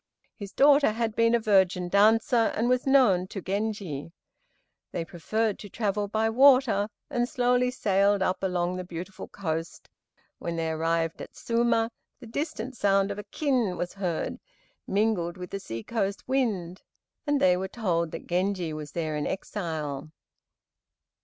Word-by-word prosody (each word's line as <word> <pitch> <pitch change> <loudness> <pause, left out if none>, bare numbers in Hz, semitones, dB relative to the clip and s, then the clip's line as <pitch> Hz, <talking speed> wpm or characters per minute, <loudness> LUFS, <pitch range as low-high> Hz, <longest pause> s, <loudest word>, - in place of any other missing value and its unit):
His 200 -2 -8
daughter 280 -4 +5
had 225 -1 -2
been 230 0 +4
a - - +3
virgin 190 -4 +2
dancer, 220 +4 +4
and 230 +3 +1
was 250 +1 +1
known 210 -10 +4
to 195 - -6
Genji. 195 -6 -3 0.8
They 165 - -3
preferred 215 +6 -2
to 205 - -9
travel 205 0 -1
by 220 +2 0
water, 255 -4 +5 0.2
and 240 -2 0
slowly 250 0 +2
sailed 200 -4 +2
up 185 - -1
along 180 -1 -1
the 185 - -4
beautiful 180 +2 -7
coast. 165 -3 -4 0.5
When 170 -1 -4
they 165 -1 -1
arrived 165 +1 -1
at - - -10
Suma, 230 -1 +1 0.3
the 255 - -11
distant 260 0 -4
sound 195 -2 +2
of 200 - -5
a - - -5
kin 250 - 0
was 175 +1 -3
heard, 180 -5 -3 0.5
mingled 195 -4 0
with 180 0 -8
the 195 - -3
sea 115 -10 -6
coast 200 -3 -2
wind, 210 -10 -1 0.5
and 290 -1 +2
they 180 -6 +5
were 190 +1 -3
told 175 -6 -1
that - - -8
Genji 180 -2 -1
was 150 -1 -7
there 160 -2 -2
in 150 - -2
exile. 160 -7 -4
200 Hz, 155 wpm, -27 LUFS, 175-230 Hz, 0.8 s, daughter